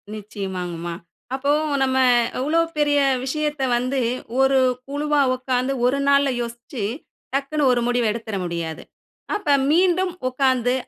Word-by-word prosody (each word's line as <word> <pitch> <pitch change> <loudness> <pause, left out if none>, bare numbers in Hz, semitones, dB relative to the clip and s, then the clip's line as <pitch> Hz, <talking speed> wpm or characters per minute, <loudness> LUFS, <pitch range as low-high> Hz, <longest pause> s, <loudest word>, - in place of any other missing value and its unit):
நிச்சயமாங்க 190 -4 -5
மா. 170 - -3 0.4
அப்போ 280 +2 0 0.3
நம்ம 260 0 +2 0.4
எவ்ளோ 305 +6 +1 0.2
பெரிய 290 -1 +3 0.2
விஷயத்த 300 +1 -2 0.2
வந்து 255 +3 -1 0.4
ஒரு 270 0 +4 0.3
குழுவா 295 +1 0
உட்கார்ந்து 255 +1 -1
ஒரு 265 +3 +2
நாள்ல 280 0 +4
யோசிச்சு, 235 0 -6 0.5
டக்குனு 280 +2 -1
ஒரு 240 -1 +2
முடிவு 245 -1 +1
எடுத்துற 220 -1 -5
முடியாது. 170 -2 -4 0.5
அப்ப 415 -6 -5 0.2
மீண்டும் 360 +1 +2 0.2
உட்கார்ந்து 255 -2 +1
265 Hz, 120 wpm, -22 LUFS, 235-290 Hz, 0.5 s, ஒரு